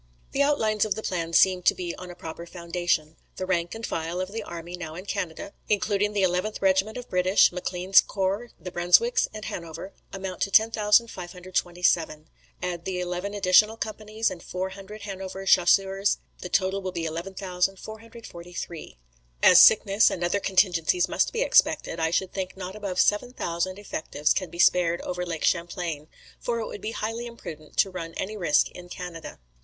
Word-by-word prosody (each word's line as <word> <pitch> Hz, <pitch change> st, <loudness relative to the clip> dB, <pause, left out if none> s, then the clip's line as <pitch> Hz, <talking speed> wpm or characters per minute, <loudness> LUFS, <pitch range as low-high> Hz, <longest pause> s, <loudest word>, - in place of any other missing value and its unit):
"The 275 Hz, -, 0 dB
outlines 220 Hz, -8 st, +2 dB
of 215 Hz, -, 0 dB
the 220 Hz, -, -6 dB
plan 170 Hz, -3 st, -2 dB
seem 185 Hz, +1 st, +5 dB
to -, -, +3 dB
be 175 Hz, -2 st, -4 dB
on 180 Hz, -, -9 dB
a 175 Hz, -, -9 dB
proper 170 Hz, -1 st, -8 dB
foundation. 170 Hz, -2 st, -2 dB, 0.2 s
The 185 Hz, -, -4 dB
rank 175 Hz, 0 st, -1 dB
and 225 Hz, 0 st, -5 dB
file 165 Hz, +2 st, -3 dB
of 185 Hz, +1 st, -3 dB
the 225 Hz, +1 st, -4 dB
army 170 Hz, -3 st, -7 dB
now 165 Hz, -3 st, -7 dB
in 180 Hz, +3 st, -8 dB
Canada 200 Hz, -2 st, -4 dB, 0.2 s
(including 205 Hz, 0 st, +1 dB
the 200 Hz, -2 st, +1 dB
11th 185 Hz, +4 st, 0 dB
Regiment 195 Hz, +3 st, +2 dB
of 245 Hz, -, -7 dB
British, 185 Hz, +2 st, +4 dB
M'Clean's 180 Hz, +1 st, +3 dB
corps, 200 Hz, +4 st, -2 dB
the 180 Hz, -, -7 dB
Brunswicks 325 Hz, -, +3 dB
and 215 Hz, 0 st, -8 dB
Hanover), 170 Hz, +3 st, -7 dB, 0.2 s
amount 190 Hz, -2 st, -6 dB
to -, -, +1 dB
10,527; 180 Hz, -7 st, +1 dB, 0.3 s
add 175 Hz, -2 st, -3 dB
the 185 Hz, -1 st, -2 dB
eleven 180 Hz, +3 st, -3 dB
additional 205 Hz, +3 st, +4 dB
companies 215 Hz, 0 st, -2 dB
and 175 Hz, -, -8 dB
four 185 Hz, +2 st, -4 dB
hundred 200 Hz, +2 st, -10 dB
Hanover 195 Hz, -1 st, -6 dB
Chasseurs, 195 Hz, +2 st, +3 dB, 0.2 s
the 180 Hz, -, -7 dB
total 190 Hz, +1 st, +1 dB
will 190 Hz, -1 st, -4 dB
be 170 Hz, -2 st, -3 dB
11,443. 180 Hz, -, -5 dB, 0.5 s
"As -, -, +9 dB
sickness 200 Hz, +3 st, +6 dB
and 175 Hz, -, -4 dB
other 175 Hz, +4 st, +1 dB
contingencies 190 Hz, -, +2 dB
must -, -, +1 dB
be 480 Hz, +1 st, 0 dB
expected, 170 Hz, -, +2 dB
I 160 Hz, 0 st, +1 dB
should 185 Hz, +2 st, -1 dB
think 190 Hz, -1 st, -4 dB
not 185 Hz, +1 st, -6 dB
above 200 Hz, -4 st, -4 dB
7,000 185 Hz, -5 st, 0 dB
effectives 155 Hz, -7 st, -1 dB
can 185 Hz, -3 st, -2 dB
be 170 Hz, -, -11 dB
spared 175 Hz, -1 st, +3 dB
over 180 Hz, 0 st, -4 dB
Lake 165 Hz, -3 st, -4 dB
Champlain; 170 Hz, -3 st, -1 dB, 0.3 s
for 235 Hz, -1 st, -2 dB
it 225 Hz, -, -3 dB
would 205 Hz, -, -8 dB
be 220 Hz, -, -4 dB
highly 225 Hz, +3 st, -3 dB
imprudent 155 Hz, -10 st, -10 dB
to 195 Hz, -, +3 dB
run 165 Hz, -2 st, -6 dB
any 210 Hz, +3 st, -4 dB
risk 170 Hz, -7 st, +2 dB
in 180 Hz, 0 st, -11 dB
Canada. 175 Hz, -3 st, -8 dB
185 Hz, 170 wpm, -26 LUFS, 175-205 Hz, 0.5 s, As